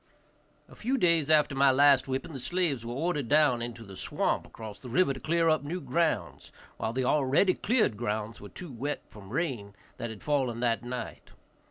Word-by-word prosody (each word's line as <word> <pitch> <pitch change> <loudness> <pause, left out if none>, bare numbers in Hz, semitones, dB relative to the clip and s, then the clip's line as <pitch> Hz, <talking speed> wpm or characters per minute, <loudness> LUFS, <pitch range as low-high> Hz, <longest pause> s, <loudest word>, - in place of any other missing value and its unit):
A - - -15
few 260 +5 -1
days 170 - +2
after 150 -2 +4
my 135 0 +4
last 140 0 +5
whipping 135 +4 -3
the 135 - -6
slaves 160 -4 -1
were 115 - -5
ordered 150 -3 -1
down 145 -5 +4
into 120 -1 -6
the 100 -3 -11
swamp - - -1
across 110 -2 -9
the 125 - -9
river 140 +3 +3
to 130 - -8
clear 165 +2 +1
up 155 -1 +3
new 165 +6 -3
grounds, 130 - -1 0.3
while 110 - -2
the 130 +2 -1
already 150 +7 +3
cleared 205 - +1
lands 110 0 -3
were 100 - -9
too 175 -5 -9
wet 135 +5 -4
from 100 -2 -12
rain 120 -8 -3 0.2
that 120 - -4
had 110 -3 -9
fallen 130 -6 0
that 115 -2 +1
night. 125 0 -6
135 Hz, 195 wpm, -29 LUFS, 115-155 Hz, 0.3 s, last